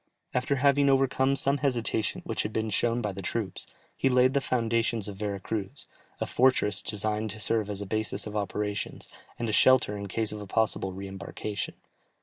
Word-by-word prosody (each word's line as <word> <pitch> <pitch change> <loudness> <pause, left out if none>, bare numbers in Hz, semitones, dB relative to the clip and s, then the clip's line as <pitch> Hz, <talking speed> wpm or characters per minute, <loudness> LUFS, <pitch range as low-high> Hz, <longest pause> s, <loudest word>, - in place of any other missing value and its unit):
After 125 +2 +1
having 140 +1 +4
overcome 135 0 +3
some 140 +1 +2
hesitation 120 -5 0
which - - -1
had 105 - -3
been 110 0 -1
shown 120 +4 +1
by 105 - -1
the 100 0 -6
troops, 105 +1 -3 0.3
he 135 - +2
laid 125 0 +4
the 140 - +2
foundations 115 -3 0
of 100 -2 -6
Vera 100 -1 -2
Cruz, 100 0 -4 0.3
a - - 0
fortress 120 -6 +3
designed 105 +1 -1
to 105 +2 -3
serve 110 -1 +1
as 100 -1 -3
a - - -3
basis 110 +2 -1
of 105 0 -6
operations, 105 0 -3 0.3
and 120 - -2
a 110 - -1
shelter 130 -3 +5
in 100 0 -5
case 110 +3 -1
of 105 0 -6
a 100 - -7
possible 110 -2 +1
re 95 +1 -6
embarkation. 100 +2 -5
110 Hz, 190 wpm, -28 LUFS, 105-125 Hz, 0.3 s, shelter